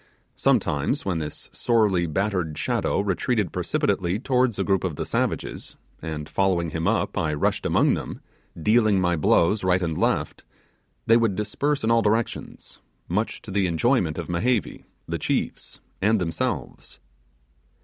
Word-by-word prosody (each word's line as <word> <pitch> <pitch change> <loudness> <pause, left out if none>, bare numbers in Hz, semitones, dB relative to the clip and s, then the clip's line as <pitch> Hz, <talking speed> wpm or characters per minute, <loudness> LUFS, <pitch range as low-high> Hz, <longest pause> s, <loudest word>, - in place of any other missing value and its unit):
Sometimes - - +1
when 90 -4 -1
this 75 -1 -6
sorely 105 -7 +2
battered 90 -2 -1
shadow - - 0
retreated 100 0 0
precipitately 90 +1 0
towards 125 -2 +1
a - - 0
group 95 -3 +1
of 90 -5 -2
the - - -4
savages, - - -3 0.2
and, 75 -2 -5
following 90 -4 0
him 80 +2 -2
up, 115 0 0
I 75 -2 0
rushed 75 - 0
among - - +3
them - - -5 0.4
dealing 110 +2 +3
my 90 -1 +2
blows 85 +6 +3
right 90 0 +3
and 85 -3 -2
left, - - -1 0.6
they 115 - +6
would 115 -5 +1
disperse 135 +8 -1
in 110 - +2
all 115 0 +4
directions 110 +2 -2 0.3
much 105 +6 -2
to 105 - -8
the 95 -1 +1
enjoyment 85 - +1
of - - -4
Mehevi, 110 +6 -1 0.2
the - - -3
chiefs, - - -3 0.2
and 105 +2 +3
themselves. 90 - -4
95 Hz, 150 wpm, -24 LUFS, 85-110 Hz, 0.6 s, they